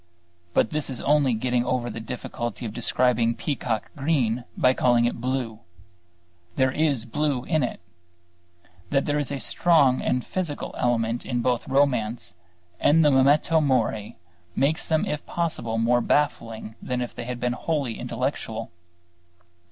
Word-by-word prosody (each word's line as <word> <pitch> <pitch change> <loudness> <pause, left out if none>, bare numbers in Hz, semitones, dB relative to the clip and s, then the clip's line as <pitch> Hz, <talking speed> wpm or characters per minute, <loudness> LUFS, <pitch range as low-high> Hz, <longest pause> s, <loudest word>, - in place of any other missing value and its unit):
But 110 - +3
this 150 -2 -1
is 130 - -4
only 140 -4 +3
getting 125 +1 0
over 125 -1 -1
the 115 - -5
difficulty 120 0 -5
of 105 - -5
describing 120 0 +1
peacock 120 -7 -2
green 130 -6 0
by 130 0 +4
calling 120 -2 +3
it 120 -1 -2
blue. 125 -3 -2 1.0
There 130 0 +3
is 140 -5 0
blue 140 +1 -1
in 155 +1 +1
it. 125 - -2 1.1
That 140 -1 +1
there 145 0 0
is 145 -1 -2
a 140 - -3
strong 145 -4 +3 0.2
physical 170 0 -4
element 115 -1 0
in 120 -1 -2
both 125 -1 0
romance 120 -9 +1 0.5
and 160 +1 +4
the 150 - +5
Memento 145 +4 +4
Mori 115 -7 0 0.4
makes 150 +4 +1
them 160 -1 +2
if 150 - -3
possible 155 -10 -2
more 120 +2 +3
baffling 115 -6 -1
than 125 -1 -2
if 125 - -4
they - - -6
had 125 0 -4
been 125 0 0
wholly 140 -4 -2
intellectual. - - -3
125 Hz, 145 wpm, -25 LUFS, 120-145 Hz, 1.1 s, the